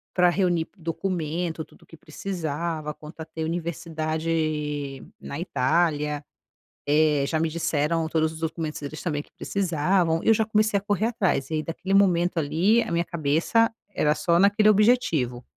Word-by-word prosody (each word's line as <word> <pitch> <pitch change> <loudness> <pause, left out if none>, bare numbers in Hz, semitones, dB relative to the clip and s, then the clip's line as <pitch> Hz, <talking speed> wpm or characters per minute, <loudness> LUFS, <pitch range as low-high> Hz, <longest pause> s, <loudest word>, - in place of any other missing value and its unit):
pra 180 -1 +5
reunir 175 -3 +1
p 200 - -38
documento, 165 -1 -3
tudo - - -20
o - - -20
que 165 - -14
precisava 160 -1 -4
quanto 155 +1 -11
a - - -5
ter 160 -1 -5
universidade 160 -1 -3 0.9
na 140 - -6
Itália, 150 -1 0 0.6
eh, 150 -1 +3
já 160 +1 -1
me 165 - +1
disseram 160 0 0
todos 160 0 0
os 160 - -10
documentos 160 -1 -3
deles 145 +2 -6
também 150 -4 -2
que - - -27
precisavam, 175 -2 0
eu 225 - +5
já 220 - +2
comecei 215 -1 +2
a - - -4
correr 205 +1 0
atrás, 190 - 0
e - - -2
aí 155 - 0
daquele 185 +5 -3
momento 180 -3 +3
ali 180 +10 +3
a - - -4
minha 170 +1 +1
cabeça 170 +8 +1 0.2
era 150 0 +2
só 170 +3 +2
naquele 205 +2 +4
objetivo, 195 - +3
165 Hz, 165 wpm, -25 LUFS, 155-185 Hz, 0.9 s, pra